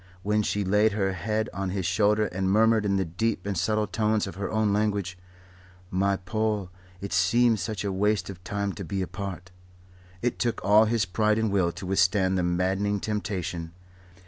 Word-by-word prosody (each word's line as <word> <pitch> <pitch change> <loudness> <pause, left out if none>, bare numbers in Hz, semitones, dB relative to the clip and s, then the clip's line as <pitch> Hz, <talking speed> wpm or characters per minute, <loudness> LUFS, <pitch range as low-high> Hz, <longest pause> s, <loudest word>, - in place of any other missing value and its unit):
When 105 +1 +2
she 105 0 -1
laid 105 +2 +3
her 95 -2 0
head 105 +4 -1
on 95 -1 -3
his 95 -1 -2
shoulder 105 +3 +2
and 95 -1 -2
murmured 110 +1 +3
in 100 - +1
the 95 -1 +1
deep 95 +4 -2
and 100 -1 -2
subtle 110 +4 +1
tones 105 +1 0
of 95 - -6
her 100 +1 -4
own 110 -2 +1
language: 100 -3 0 0.8
"My 100 +1 +1
Paul, 105 0 -2 0.3
it 100 0 -5
seems 110 +4 +3
such 105 +1 -3
a 100 - -1
waste 105 +2 +1
of 90 -2 -9
time 100 0 -2
to 100 - -7
be 95 +2 -2
apart," 90 -1 -6 0.7
it 120 - -1
took 120 -2 0
all 105 +2 +6
his 110 -2 +1
pride 105 +3 +1
and 110 -2 0
will 95 -4 +2
to - - -8
withstand 95 0 +2
the 90 - +1
maddening 95 +3 0
temptation. 90 -6 -3
100 Hz, 185 wpm, -26 LUFS, 95-105 Hz, 0.8 s, all